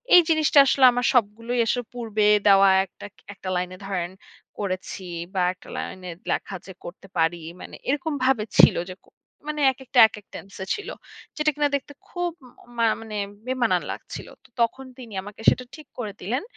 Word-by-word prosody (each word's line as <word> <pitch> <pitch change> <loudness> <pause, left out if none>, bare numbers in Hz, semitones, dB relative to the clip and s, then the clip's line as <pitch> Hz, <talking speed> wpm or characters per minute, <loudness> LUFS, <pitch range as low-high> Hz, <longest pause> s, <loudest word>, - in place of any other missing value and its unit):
এই 355 - +10
জিনিসটা 310 -2 +4
আসলে 265 -1 +5
আমার 245 +1 -1
সবগুলোই 230 +1 +1
আসলে 245 +1 0
পূর্বে 220 -3 -1 0.2
দেওয়া 195 0 +7 0.2
একটা 190 - -13
ক - - -65 0.2
একটা 190 -1 -7
লাইনে 180 +1 -2
ধরেন 180 -3 -3 0.5
করেছি 190 0 -4 0.3
বা 185 - 0
একটা 185 - -19
লাইনে 185 -1 -6 0.2
লেখা 195 - -2
যে 190 - -9
করতে 185 +2 -10
পারি। 165 +1 +2 0.2
মানে - - -9
এরকম 295 +2 0
ভাবে 255 -5 +3
ছিল 175 - +8
যে 185 - -7
কো - - -25 0.4
মানে 300 -1 -2
একেকটা 265 0 -1
একেক 210 -2 -12
টেনসে 195 -1 -8
ছিল। 415 - -8 0.5
যেটা 305 0 +2
কিনা 295 -1 +2
দেখতে 280 +1 -5
খুব 355 -1 -2 0.3
উম 240 - -19
মা 230 - +3 0.2
মানে 215 -2 -6 0.3
বেমানান 240 -8 +1
লাগছিল। - - -8 0.2
তো - - -22
তখন 260 +3 0
তিনি 235 -5 -10
আমাকে 205 +2 -11
সেটা 250 - -1
ঠিক 305 -3 -13
করে 210 -4 -4
দিলেন। 250 - -2
225 Hz, 175 wpm, -24 LUFS, 195-265 Hz, 0.5 s, এই